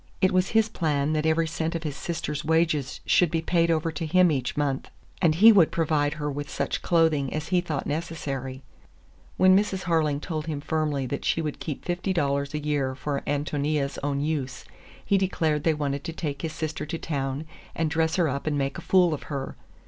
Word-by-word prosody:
It 185 - +3
was 185 +1 +2
his 220 -1 +3
plan 150 -6 0
that 155 0 +1
every 160 +1 +2
cent 160 +1 -2
of 165 - -3
his 150 -3 -3
sister's 150 -1 -4
wages 160 -4 +1
should 180 - +4
be 165 +1 -1
paid 170 0 +2
over 165 0 +1
to 160 +1 -4
him 180 +1 +4
each 130 -1 -2
month, 140 -2 -1 0.3
and 160 -4 +4
he 220 +7 +9
would 190 -7 +5
provide 150 -3 +1
her 150 -1 -3
with 145 +1 -5
such - - -2
clothing 160 -6 +2
as 155 +1 -4
he 180 -1 +3
thought 155 -5 -3
necessary. 140 -4 -4 0.7
When 185 0 +6
Mrs. 195 -2 +1
Harling 155 -4 +1
told 155 -1 -4
him 150 -3 -2
firmly 150 -2 -1
that 140 +3 -4
she - - +1
would 155 -3 -3
keep 150 -4 -5
fifty 180 +2 -1
dollars 140 -3 0
a - - -1
year 145 -3 -1
for 140 +1 -3
Ántonia's 145 0 -1
own 140 0 -1
use, 140 -4 -3 0.4
he 200 - +3
declared 160 -6 0
they 160 -1 +2
wanted 140 -1 -2
to 165 - -4
take 145 -4 -4
his 160 -1 -3
sister 155 -1 -4
to 165 - -3
town 140 -2 -3 0.3
and 160 -2 0
dress 160 0 +1
her 175 -3 +2
up 140 +2 -3
and 150 -1 +1
make 135 -1 -2
a - - -8
fool 180 -3 +4
of 150 - -4
her. 140 -2 -4
155 Hz, 210 wpm, -26 LUFS, 145-165 Hz, 0.7 s, he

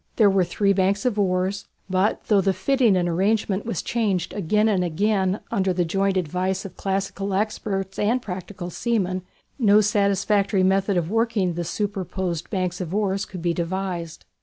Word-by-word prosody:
There 210 -3 +5
were 190 -1 +3
three 200 +3 +1
banks 195 +4 +1
of 225 -4 +1
oars, 190 +1 0 0.2
but 190 +2 +1
though 205 -3 +3
the 190 0 +1
fitting 240 -1 +3
and 175 -1 +1
arrangement 195 +3 0
was 230 - -2
changed 210 -7 -1
again 210 +3 +1
and 195 -4 +2
again 190 +3 0
under 190 -1 +1
the 175 0 +1
joint 195 +3 0
advice 185 +3 -1
of 195 - -8
classical 195 0 -2
experts 195 -2 -2
and 225 +5 +2
practical 185 -3 -6
seamen, 185 -4 -1 0.4
no 210 -3 +6
satisfactory 200 -1 +2
method 195 +1 +2
of 170 +1 -1
working 225 -5 +1
the 175 +1 -3
superposed 185 -2 -3
banks 185 -1 -2
of 180 +1 -4
oars 200 -2 0
could 180 -3 -8
be 170 -1 +1
devised. 175 -1 -4
195 Hz, 165 wpm, -23 LUFS, 185-205 Hz, 0.4 s, no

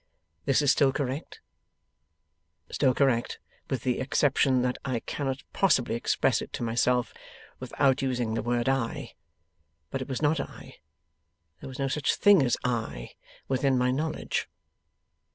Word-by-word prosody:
'This 135 +2 +3
is 140 - +5
still 140 -3 +3
correct? 135 +2 -4 1.3
Still 130 -3 +2
correct, 125 -4 +1 0.3
with 130 -4 -2
the 125 -2 0
exception 130 -1 +2
that 125 0 -1
I 130 -4 -2
cannot 135 -1 -4
possibly 155 -11 +2
express 115 - +1
it - - -8
to - - -4
myself 120 +1 +1 0.5
without 135 -2 +1
using 125 -4 -1
the 115 - -1
word 120 0 -1
I. 135 0 -1 0.8
But 135 - -3
it 130 - -6
was 130 - -2
not 150 +1 +2
I. - - -8 0.8
There - - -8
was 130 - -9
no 135 - -1
such 145 +2 0
thing 205 -5 +6
as 125 -3 +2
I, 115 - -3 0.4
within 135 0 +1
my 125 0 +2
knowledge. 155 +4 -2
130 Hz, 145 wpm, -27 LUFS, 125-140 Hz, 1.3 s, thing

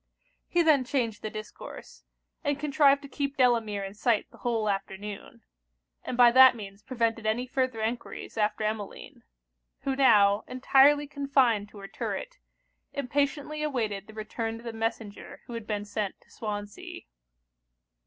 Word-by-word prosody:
He 345 -1 +2
then 300 -5 +4
changed 240 -5 -1
the 215 - -4
discourse; 215 0 -10 0.4
and 285 -2 0
contrived 285 -1 +3
to - - -8
keep 280 +1 -3
Delamere 230 -5 +2
in 195 0 -6
sight 220 +1 +1
the - - -17
whole 230 -3 -1
afternoon; 195 0 -5 0.6
and 245 - -4
by 240 -1 +8
that 260 0 +8
means 200 -2 -9
prevented 230 -1 -1
any 230 +3 0
further 255 -3 -1
enquiries 230 +2 -4
after 215 0 0
Emmeline; 215 -2 -5 0.6
who 270 -1 -1
now, 210 -6 +5
entirely 275 +3 +4
confined 270 -7 +1
to 210 - -15
her 195 -1 -8
turret, - - -5 0.5
impatiently 285 +2 -1
awaited 220 -9 -2
the 220 - -12
return 225 +1 -4
of 230 - -11
the 230 -1 -5
messenger 225 -2 -5
who 240 - -9
had 230 -2 -6
been 205 -1 -2
sent 205 -1 -3
to - - -26
Swansea. 205 -2 -6
230 Hz, 150 wpm, -28 LUFS, 210-270 Hz, 0.6 s, by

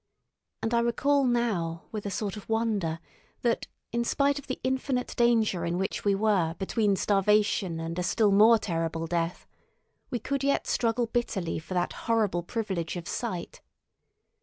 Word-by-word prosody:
And 225 - 0
I 235 - +4
recall 275 +4 +2
now 210 -10 0
with 210 -2 -4
a - - -1
sort 200 +1 -3
of 210 - -10
wonder 215 -8 0 0.5
that, 235 -1 +1 0.2
in 235 0 0
spite 280 +4 +1
of 280 - -13
the 260 - -4
infinite 260 -1 -1
danger 225 -7 +3
in 170 +1 -1
which 190 +1 -2
we 200 -1 +3
were 195 -6 +2
between 205 +1 +1
starvation 195 -3 +2
and 165 +2 -4
a - - +1
still 205 +3 +2
more 215 +3 +7
terrible 165 -4 -2
death, 165 +1 -2 0.6
we 245 - -1
could 275 +4 -2
yet 280 0 +1
struggle 235 0 +1
bitterly 225 -8 -2
for 175 +3 -7
that 175 0 0 0.2
horrible 215 -6 +2
privilege 190 -4 -3
of 175 -1 -6
sight. 185 -8 -4
210 Hz, 160 wpm, -28 LUFS, 175-235 Hz, 0.6 s, more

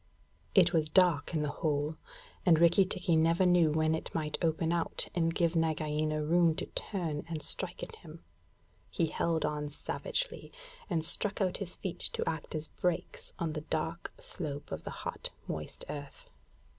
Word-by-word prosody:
It 180 -2 +6
was 155 -2 +2
dark 170 -4 +4
in 150 - +1
the 145 - -1
hole; 150 0 +1 0.5
and 170 -3 +6
Rikki 170 +4 +6
tikki 180 -2 +1
never 165 +3 +4
knew 175 -3 +5
when 155 +1 +2
it 160 - -4
might 155 -2 0
open 165 0 +1
out 170 -1 0
and 165 -1 +2
give 170 0 +1
Nagaina 155 -1 +1
room 165 +1 +4
to - - -3
turn 165 -7 -3
and 160 -2 -3
strike - - -3
at 460 - -7
him. - - -12 0.7
He 170 - +1
held 165 0 0
on 150 -1 -2
savagely, - - -2 0.4
and 165 -4 0
struck 205 +4 -1
out 185 -3 +1
his 185 -3 -5
feet 180 -2 -4
to - - -2
act 165 0 -3
as 155 0 -1
brakes 180 +1 -2
on 165 -2 -1
the 150 - -3
dark 160 +2 -2
slope 145 -4 -4
of - - -5
the - - -3 0.2
hot, - - -3 0.2
moist 75 -1 -5
earth. 145 -1 -7
165 Hz, 170 wpm, -32 LUFS, 155-175 Hz, 0.7 s, It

